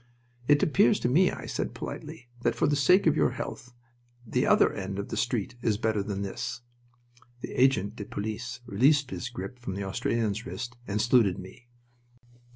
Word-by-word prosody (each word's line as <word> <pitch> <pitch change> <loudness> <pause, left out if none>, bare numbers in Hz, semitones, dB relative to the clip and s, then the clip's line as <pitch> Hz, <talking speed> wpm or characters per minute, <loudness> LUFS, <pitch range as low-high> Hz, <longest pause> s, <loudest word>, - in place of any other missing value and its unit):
"It 145 0 +5
appears 125 -5 +4
to - - +1
me," 175 +9 +4
I - - -6
said, - - -3
politely, 120 - -7
"that 120 -1 +1
for - - +1
the 145 - +2
sake 180 +8 +4
of 160 -2 +4
your - - +3
health 125 -1 -6 0.5
the 110 - 0
other - - +5
end 95 0 -5
of 100 - -4
the - - -3
street 120 -1 -1
is 110 -4 +1
better 110 -2 0
than 100 0 -3
this." 100 +4 -4 0.8
The - - -6
agent 120 -5 +2
de 105 - -5
police 115 +5 -5
released 130 +6 +3
his 120 - -4
grip 120 +1 -7
from 95 -6 -5
the 100 - -3
Australian's 110 +2 -1
wrist 125 -1 -6
and 105 +1 -1
saluted 110 -4 +4
me. 95 +6 -11
120 Hz, 180 wpm, -28 LUFS, 100-130 Hz, 0.8 s, It